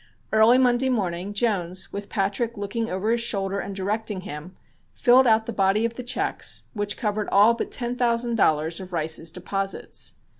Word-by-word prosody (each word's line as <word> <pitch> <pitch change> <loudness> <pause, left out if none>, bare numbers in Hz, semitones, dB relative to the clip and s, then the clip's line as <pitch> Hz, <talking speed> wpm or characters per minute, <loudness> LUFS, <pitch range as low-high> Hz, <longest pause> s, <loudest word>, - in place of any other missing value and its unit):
Early 220 +3 +6
Monday 255 0 +3
morning 190 -5 -2
Jones, 190 -4 -1
with 200 0 -6
Patrick 205 +3 -1
looking 225 +3 -3
over 190 +4 -1
his 235 0 +1
shoulder 200 -4 0
and 200 - -5
directing 205 +1 -2
him, 150 +2 -8 0.4
filled 255 +1 +5
out 220 -1 +4
the 235 - -5
body 195 +2 +2
of 230 - -2
the 250 - -6
checks, 250 +1 -1
which 205 -2 -2
covered 210 -2 -2
all 210 +4 +6
but 230 - -4
ten 240 0 -2
thousand 235 -1 +1
dollars 160 -6 +2
of 185 -1 -9
Rice's 160 0 -1
deposits. 195 +3 -4
205 Hz, 175 wpm, -24 LUFS, 190-235 Hz, 0.4 s, Early